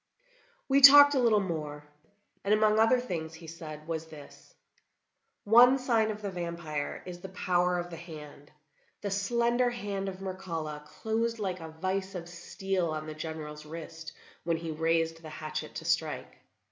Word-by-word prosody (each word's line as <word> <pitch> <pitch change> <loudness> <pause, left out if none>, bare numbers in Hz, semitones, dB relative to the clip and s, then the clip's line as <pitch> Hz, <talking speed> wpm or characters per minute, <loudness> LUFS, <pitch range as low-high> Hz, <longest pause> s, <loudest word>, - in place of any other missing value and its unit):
We 275 0 +4
talked 285 +1 +10
a 270 - +2
little 230 -4 +4
more, 150 -6 -4 0.6
and 205 +2 +3
among 215 0 +3
other 225 +3 +5
things 165 -9 -5
he 165 +1 -12
said 155 -2 -9
was 160 -1 -4
this: 150 -3 -14 0.9
"One 245 +5 +7
sign 230 -4 +1
of 215 0 -5
the 200 - -3
vampire 170 -4 -4
is 175 -1 -8
the 190 - -8
power 180 0 +1
of 175 0 -4
the 165 - -7
hand. 150 -4 -11 0.5
The 200 - -3
slender 235 +5 +1
hand 200 -4 -4
of 185 - -7
Mircalla 165 -6 -5
closed 230 +1 -2
like 190 -4 -3
a 160 -1 -8
vice 190 +4 -3
of 170 -1 -6
steel 180 +1 -3
on 155 0 -4
the 155 - -6
General's 155 -1 -7
wrist 160 0 -8 0.3
when 170 -1 0
he 165 0 -5
raised 165 +1 0
the 160 - -9
hatchet 155 0 -6
to 160 - -6
strike. 160 -2 -1
175 Hz, 165 wpm, -29 LUFS, 160-210 Hz, 0.9 s, talked